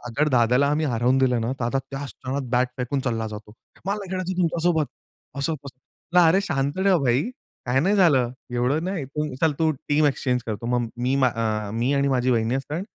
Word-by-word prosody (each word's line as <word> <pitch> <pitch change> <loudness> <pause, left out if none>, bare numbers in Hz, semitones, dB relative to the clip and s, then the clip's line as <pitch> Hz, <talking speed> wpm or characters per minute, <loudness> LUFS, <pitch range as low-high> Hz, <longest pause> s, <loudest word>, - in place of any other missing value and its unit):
अगर 145 +6 0
दादाला 125 +1 +3
आम्ही 155 +1 +1
हरवून 125 +1 +2
दिलं 125 -3 +2
ना, 115 +3 -1
तर 135 - -9
दादा 135 +3 0
त्या 135 +1 -4
क्षणात 135 0 -5
बॅट 125 0 +2
फेकून 130 +2 -2
चालला 115 -4 -1
जातो. 105 0 -9 0.3
"मला 200 +2 0
नाही 195 -2 -8
खेळायचं 185 0 -3
तुमच्यासोबत," 165 -2 +2 0.5
असं, 155 +3 0
तसं. 140 +6 -4
"अरे 185 +5 +4
शांत 140 -6 -1
ठेव 190 -3 +5
भाई, 125 +3 +3 0.4
काय 125 +2 +2
नाही 190 +8 +2
झालं, 135 -10 +4 0.2
एवढं 135 +7 +1
नाही. 180 -7 -3 0.3
चल 160 -2 +3
तू 160 -1 +3 0.2
टीम 150 +1 +3
एक्सचेंज 125 -3 0
करतो. 110 +1 -4
मग 120 -2 0
मी 130 +2 +1
अ, 110 -3 -1
मी 120 +4 +1
आणि 140 0 +2
माझी 125 +1 +1
वहिनी 115 0 +1
असते, 145 +4 -3
135 Hz, 195 wpm, -24 LUFS, 120-155 Hz, 0.5 s, ठेव